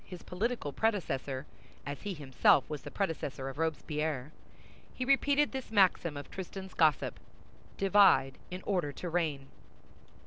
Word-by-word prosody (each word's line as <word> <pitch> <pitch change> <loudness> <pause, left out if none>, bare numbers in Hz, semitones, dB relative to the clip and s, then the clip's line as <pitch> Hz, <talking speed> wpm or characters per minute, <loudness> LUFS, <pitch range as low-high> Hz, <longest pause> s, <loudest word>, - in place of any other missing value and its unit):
his 180 -2 -10
political 190 - -2
predecessor, 140 -10 -1 0.4
as 145 -1 -5
he 205 -2 -4
himself 135 -2 +3
was 150 -2 -5
the - - -8
predecessor 145 -8 -3
of 135 +3 -9
Robespierre, 150 -3 -2 0.6
he 255 - -2
repeated 280 +2 +3
this 265 -2 -5
maxim 185 -7 +3
of 145 - -7
Tristan's 190 0 -7
gossip: 155 -4 +2 0.6
"Divide 195 -9 +5
in 180 +1 -6
order 180 -8 0
to 175 - -5
reign." 155 -5 -1
165 Hz, 135 wpm, -32 LUFS, 145-195 Hz, 0.6 s, Divide